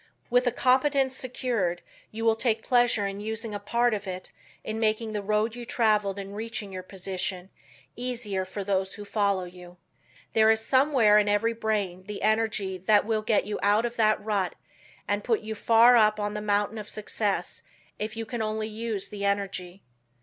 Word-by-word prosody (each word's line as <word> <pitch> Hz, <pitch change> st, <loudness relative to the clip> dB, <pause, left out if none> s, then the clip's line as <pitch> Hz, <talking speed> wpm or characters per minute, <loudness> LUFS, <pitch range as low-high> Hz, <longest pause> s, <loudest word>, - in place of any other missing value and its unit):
With 245 Hz, +1 st, +3 dB
a -, -, +3 dB
competence 265 Hz, +2 st, +2 dB
secured, 240 Hz, -9 st, -2 dB, 0.3 s
you 225 Hz, +1 st, -5 dB
will 225 Hz, -1 st, +4 dB
take 225 Hz, -1 st, 0 dB
pleasure 240 Hz, -4 st, +3 dB
in 195 Hz, 0 st, -4 dB
using 220 Hz, +1 st, -4 dB
a 205 Hz, -, -3 dB
part 235 Hz, +3 st, +1 dB
of 205 Hz, -1 st, -4 dB
it 185 Hz, 0 st, -6 dB, 0.3 s
in 220 Hz, +1 st, -4 dB
making 220 Hz, 0 st, 0 dB
the 210 Hz, -, -2 dB
road 215 Hz, +3 st, 0 dB
you 245 Hz, -, -7 dB
traveled 210 Hz, -4 st, +1 dB
in 200 Hz, 0 st, -7 dB
reaching 220 Hz, -2 st, -5 dB
your 185 Hz, -, -5 dB
position 185 Hz, 0 st, -5 dB, 0.4 s
easier 235 Hz, -6 st, -2 dB
for 195 Hz, +2 st, -6 dB
those 190 Hz, -1 st, -1 dB
who 205 Hz, -, -8 dB
follow 200 Hz, -2 st, +1 dB
you. 180 Hz, 0 st, -12 dB, 0.6 s
There 220 Hz, 0 st, +5 dB
is 220 Hz, 0 st, +4 dB
somewhere 260 Hz, -6 st, +5 dB
in 205 Hz, 0 st, +1 dB
every 215 Hz, +3 st, +2 dB
brain 205 Hz, -5 st, -2 dB
the 210 Hz, -1 st, -6 dB
energy 215 Hz, -3 st, 0 dB
that 205 Hz, +3 st, +3 dB
will 220 Hz, -1 st, 0 dB
get 215 Hz, -1 st, +1 dB
you 210 Hz, -, -3 dB
out 205 Hz, +3 st, +3 dB
of 240 Hz, 0 st, -4 dB
that 215 Hz, -1 st, +3 dB
rut 200 Hz, -5 st, 0 dB, 0.5 s
and 205 Hz, 0 st, -1 dB
put 230 Hz, -3 st, +1 dB
you 220 Hz, 0 st, -5 dB
far 230 Hz, +3 st, +6 dB
up 215 Hz, -1 st, +4 dB
on 205 Hz, 0 st, -2 dB
the 210 Hz, -, -4 dB
mountain 205 Hz, +1 st, 0 dB
of 210 Hz, -, -8 dB
success 210 Hz, -1 st, -2 dB, 0.4 s
if 215 Hz, +2 st, -4 dB
you 225 Hz, -, -3 dB
can 235 Hz, 0 st, -4 dB
only 215 Hz, 0 st, -2 dB
use 220 Hz, -2 st, -4 dB
the 205 Hz, -1 st, -6 dB
energy. 195 Hz, -2 st, -2 dB
215 Hz, 185 wpm, -27 LUFS, 200-225 Hz, 0.6 s, far